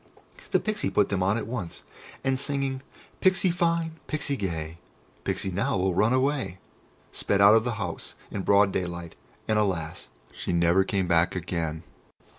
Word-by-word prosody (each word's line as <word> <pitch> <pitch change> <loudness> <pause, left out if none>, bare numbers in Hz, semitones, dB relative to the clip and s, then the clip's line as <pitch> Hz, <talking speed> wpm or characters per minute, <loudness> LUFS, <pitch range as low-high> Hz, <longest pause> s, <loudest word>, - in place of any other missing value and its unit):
The - - +3
Pixy 215 -2 -1
put 105 -1 +3
them 95 -2 0
on 95 +4 +2
at 115 - -3
once, 105 -7 -5 0.4
and 135 -1 +1
singing 135 -1 -1 0.4
"Pixy 185 -1 +4
fine, 165 -2 0
Pixy 150 -2 -1
gay, 85 - -4 0.5
Pixy 95 - -1
now 100 +1 0
will 95 0 +1
run 110 +6 +3
away!" 130 -6 +1 0.5
sped 100 - +1
out 100 +1 +8
of 110 +1 +4
the 120 -2 -1
house 105 - -5 0.2
in 100 - -3
broad 100 +1 +4
daylight, 85 -2 -4 0.3
and, 110 -1 +2
alas! 90 -7 -2 0.2
she - - -3
never 85 +2 +4
came 95 -2 0
back 85 +1 +3
again." 85 -3 -3
100 Hz, 160 wpm, -27 LUFS, 90-135 Hz, 0.5 s, out